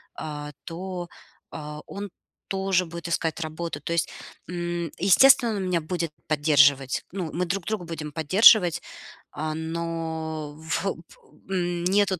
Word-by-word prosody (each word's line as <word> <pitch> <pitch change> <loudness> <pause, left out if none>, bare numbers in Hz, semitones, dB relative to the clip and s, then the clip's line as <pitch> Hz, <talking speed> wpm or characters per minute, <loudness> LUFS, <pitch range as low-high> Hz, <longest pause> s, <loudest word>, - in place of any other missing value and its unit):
а 150 -1 -6
то 180 +1 -5 0.4
а, 150 -1 -7
он 200 0 -6 0.4
тоже 190 -1 +1
будет 170 +1 -7
искать 165 -1 -1
работу. 160 -1 -4
То 165 - -3
есть, 170 0 +1 0.4
м, 175 -2 -3
естественно, 240 +5 +6
он 195 - -2
меня 180 -2 +1
будет 170 0 -3 0.2
поддерживать, 140 -3 +4
ну, 175 -4 -4
мы 180 +2 0
друг 180 0 -2
друга 215 -5 -2
будем 160 -3 -6
поддерживать, 180 +3 +6 0.5
а, 155 0 -3
но 160 -2 -4 0.3
во 195 - +1 0.6
м, 175 -2 -1
нету 195 -1 +2
170 Hz, 135 wpm, -26 LUFS, 155-185 Hz, 0.6 s, естественно